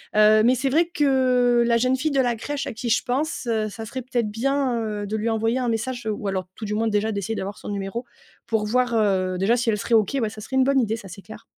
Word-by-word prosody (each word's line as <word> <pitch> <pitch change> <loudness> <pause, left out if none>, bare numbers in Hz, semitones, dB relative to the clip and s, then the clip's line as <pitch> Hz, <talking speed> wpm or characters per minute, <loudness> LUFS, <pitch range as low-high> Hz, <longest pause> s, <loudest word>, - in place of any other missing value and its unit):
heu, 215 0 +6
mais 245 +3 +4
c'est 270 +2 0
vrai 325 +6 +3
que 255 -6 +3
la 235 - +3
jeune 255 +2 +2
fille 305 +3 -1
de 270 -1 +3
la 240 -2 +1
crèche 290 +4 -4
à - - -3
qui 235 +2 -4
je 220 - +2
pense, 280 +5 -2
heu, 220 -2 0
ça 225 +2 -8
serait 260 +3 -5
peut-être 240 -3 -1
bien, 260 +3 0
heu, 210 -2 -3
de 215 +2 -2
lui 215 +2 -2
envoyer 225 +2 0
un 250 - -1
message 235 +1 -3
ou 210 -1 -3
alors, 185 -1 -3
tout - - -10
du 210 - -3
moins, 225 +1 0
déjà 215 +1 0
d'essayer 200 +2 -3
d'avoir 200 +2 -5
son - - -11
numéro 200 +4 -4 0.4
pour 220 -2 0
voir, 250 +2 +1
heu, 190 -4 +1
déjà, 220 +6 +3
si 235 -1 0
elle 210 - +1
serait 230 +3 +1
OK. 220 +5 +2
Ouais, 220 - 0
ça 215 - -11
serait 265 +5 -6
une 260 - +5
bonne 275 +1 +3
idée, 225 -3 0
ça 200 - -10
c'est 195 +3 -11
clair. 220 - -12
225 Hz, 275 wpm, -23 LUFS, 210-255 Hz, 0.4 s, heu